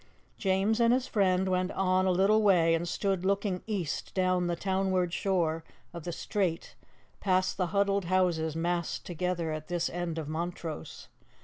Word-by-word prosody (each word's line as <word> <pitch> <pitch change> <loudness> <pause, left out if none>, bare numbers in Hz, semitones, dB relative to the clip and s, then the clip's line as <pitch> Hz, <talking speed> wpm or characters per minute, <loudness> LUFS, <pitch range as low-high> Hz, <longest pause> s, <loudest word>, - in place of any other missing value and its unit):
James 195 +3 +1
and 235 0 +5
his 255 0 -1
friend 190 -4 +2
went 185 0 +1
on 185 0 +2
a - - +4
little 195 +4 +4
way 175 -5 +4
and 165 +1 0
stood 190 0 -1
looking 195 -1 0
east 190 -8 -3
down 185 -1 +2
the 175 - 0
townward 190 -1 0
shore 170 -5 0 0.3
of 170 -3 -8
the 175 - -3
strait 175 -1 -2 0.5
past 185 -1 +1
the 180 -2 0
huddled 200 0 +1
houses 170 -4 +1
massed 170 +1 -2
together 175 -1 -2
at 155 0 -5
this 175 -1 -1
end 175 -2 -3
of 160 -3 -4
Montrose. 165 - -5
185 Hz, 165 wpm, -29 LUFS, 170-195 Hz, 0.5 s, and